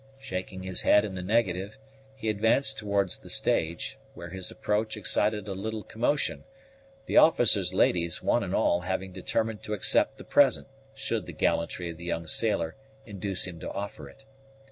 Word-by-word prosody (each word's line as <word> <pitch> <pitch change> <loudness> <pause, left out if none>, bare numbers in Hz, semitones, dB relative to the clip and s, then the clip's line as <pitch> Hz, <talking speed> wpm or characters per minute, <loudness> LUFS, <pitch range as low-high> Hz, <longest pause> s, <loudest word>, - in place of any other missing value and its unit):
Shaking 95 -6 -6
his 95 -1 -2
head 105 - +5
in 100 - -5
the 90 - -5
negative, 100 0 0 0.4
he 110 - -6
advanced 110 +6 +3
towards 100 -3 0
the - - -13
stage, 85 +1 0 0.2
where 85 0 -8
his 95 0 -2
approach 110 +1 -1
excited 105 0 0
a 100 - -3
little 110 +3 -4
commotion, 125 +6 -1 0.6
the - - 0
officers' 105 - +5
ladies, 85 -2 +2
one - - +2
and - - -2
all, 85 - +2
having 95 +1 -3
determined 110 +4 -2
to 105 - -5
accept 100 - +3
the - - -10
present, - - +3 0.3
should - - -2
the - - -7
gallantry 85 +1 -1
of 80 - -11
the 85 - -10
young 85 -1 -2
sailor 95 -2 0 0.3
induce 100 -3 -3
him 90 -3 -8
to - - -6
offer 100 +2 -6
it. 135 - -18
100 Hz, 170 wpm, -28 LUFS, 90-110 Hz, 0.6 s, head